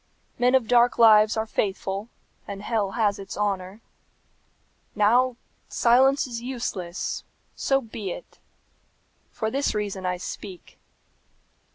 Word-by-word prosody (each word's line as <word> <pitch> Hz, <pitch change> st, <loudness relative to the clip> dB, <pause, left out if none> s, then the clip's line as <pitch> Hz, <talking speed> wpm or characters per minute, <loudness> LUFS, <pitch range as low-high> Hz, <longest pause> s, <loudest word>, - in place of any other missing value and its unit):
Men 250 Hz, +2 st, +4 dB
of 250 Hz, -4 st, +2 dB
dark 245 Hz, 0 st, +4 dB
lives 215 Hz, -1 st, +6 dB
are 220 Hz, -, 0 dB
faithful, 200 Hz, 0 st, -2 dB, 0.4 s
and 200 Hz, 0 st, -7 dB
hell 210 Hz, -4 st, -1 dB
has 210 Hz, -3 st, +1 dB
its 195 Hz, -1 st, -8 dB
honour. 200 Hz, 0 st, -2 dB, 1.1 s
Now 240 Hz, +4 st, +3 dB, 0.3 s
silence 265 Hz, +4 st, +4 dB
is 235 Hz, -3 st, -6 dB
useless. 215 Hz, -8 st, -4 dB, 0.3 s
So 270 Hz, 0 st, +1 dB
be 220 Hz, -4 st, -6 dB
it! -, -, -9 dB, 0.9 s
For 220 Hz, 0 st, -3 dB
this 275 Hz, -2 st, 0 dB
reason 200 Hz, -3 st, -3 dB
I 180 Hz, 0 st, -1 dB
speak. 185 Hz, 0 st, -9 dB
215 Hz, 115 wpm, -25 LUFS, 195-240 Hz, 1.1 s, lives